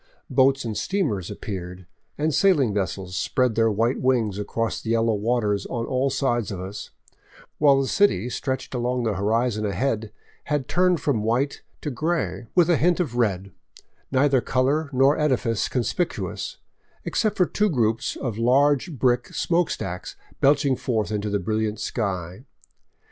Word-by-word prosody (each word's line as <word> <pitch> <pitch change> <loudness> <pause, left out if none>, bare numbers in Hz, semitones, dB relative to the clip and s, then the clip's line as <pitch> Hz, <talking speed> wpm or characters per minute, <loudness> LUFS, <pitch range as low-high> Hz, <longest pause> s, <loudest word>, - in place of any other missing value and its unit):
Boats 135 0 +3
and 110 -2 -3
steamers 140 - -1
appeared, 90 -2 -6 0.3
and 155 +1 0
sailing 145 - +3
vessels 95 -1 -3
spread 125 +3 +1
their 115 0 +3
white 115 +4 0
wings 115 -6 +1
across 115 +2 -2
the - - -6
yellow 115 0 +2
waters 105 -2 0
on 115 -1 -3
all 130 +2 0
sides 125 -4 0
of 95 - -5
us, 95 +3 -7 0.7
while 140 -2 +5
the 135 - 0
city 165 - +2
stretched 130 +1 -3
along 125 0 -1
the 110 -2 0
horizon 110 +3 0
ahead 110 +1 -1 0.3
had 145 -3 -1
turned 180 0 +2
from 130 -7 0
white 120 +6 0 0.2
to 150 - -3
gray, 120 - -2
with 175 -3 +5
a 170 -4 +3
tint 175 +2 +3
of 150 -10 -1
red, 100 -5 0 0.6
neither 135 -1 +3
color 140 +6 0
nor 135 +3 +3
edifice 125 -7 +1
conspicuous, 130 +8 -2 0.5
except 215 -2 0
for 180 - +4
two 210 +4 +1
groups 115 - 0
of 120 -6 -4
huge 140 +6 +2
brick 120 0 +2
smoke 170 -1 0
stacks 90 0 -5 0.2
belching 140 -1 +3
forth 110 -5 -2
into 105 0 -2
the 100 - +1
brilliant 110 +2 -2
sky. 95 -2 -3
120 Hz, 155 wpm, -24 LUFS, 105-140 Hz, 0.7 s, while